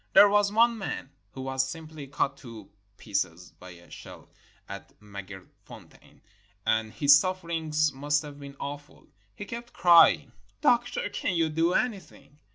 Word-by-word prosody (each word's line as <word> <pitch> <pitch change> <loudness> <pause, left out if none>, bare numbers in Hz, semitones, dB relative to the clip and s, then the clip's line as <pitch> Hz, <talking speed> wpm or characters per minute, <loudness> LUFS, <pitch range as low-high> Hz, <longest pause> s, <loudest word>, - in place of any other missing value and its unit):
There 205 - +8
was 205 0 +2
one 230 +1 +3
man 170 -7 -5 0.2
who 130 - -7
was 130 0 -1
simply 155 -1 -9
cut 140 0 -1
to 115 -7 -11 0.3
pieces 90 -4 -3
by 90 - -12
a 85 -1 -15
shell - - -12 0.4
at - - -10
Maaghersfontein, 100 -2 -13 0.4
and 110 0 0
his 140 +5 +6
sufferings 165 -4 -1
must 145 +3 0
have 145 -1 -10
been 140 -1 -10
awful. 145 +1 -8 0.3
He 205 - -7
kept 235 +2 -8
crying, 170 -1 +5 0.3
"Doctor, 245 -6 +1
can't 180 - -2
you 165 -1 +1
do 165 +3 +1
anything?" 170 - -4
145 Hz, 145 wpm, -27 LUFS, 130-185 Hz, 0.4 s, There